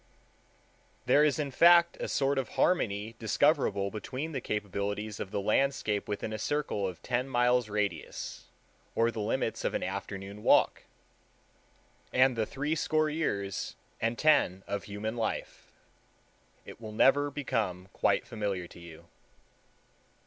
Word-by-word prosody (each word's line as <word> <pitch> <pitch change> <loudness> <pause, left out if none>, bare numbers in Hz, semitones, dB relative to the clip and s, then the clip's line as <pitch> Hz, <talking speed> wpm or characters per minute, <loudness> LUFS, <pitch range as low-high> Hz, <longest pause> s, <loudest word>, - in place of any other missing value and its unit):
There 145 - +5
is 150 -2 +3
in 145 -3 -2
fact 170 +4 +6
a - - -3
sort 135 0 +1
of 130 - -3
harmony 110 - +1
discoverable 105 -3 +2
between 130 +9 -5
the 135 -4 -3
capabilities 105 0 -3
of 95 - -4
the 100 - -2
landscape 110 0 +1
within 105 +1 -3
a 110 - -4
circle 125 -7 -1
of 90 -3 -8
ten 125 +2 -1
miles' 125 -2 +2
radius, 100 -5 -3 0.5
or 115 +1 +3
the 115 - -6
limits 115 +2 -1
of - - -1
an - - -1
afternoon 100 +1 -5
walk, - - +3 1.3
and 130 0 +4
the 110 -1 -1
threescore 155 +2 0
years 100 - -2 0.3
and 115 +1 0
ten 140 - +3
of 100 -1 -4
human 105 +2 -4
life. 115 -2 -4 0.9
It - - -11
will 110 -1 -7
never 145 +6 +4
become 105 -10 -2
quite - - +1
familiar 100 -5 -3
to - - -13
you. 85 -2 -12
110 Hz, 135 wpm, -30 LUFS, 100-135 Hz, 1.3 s, fact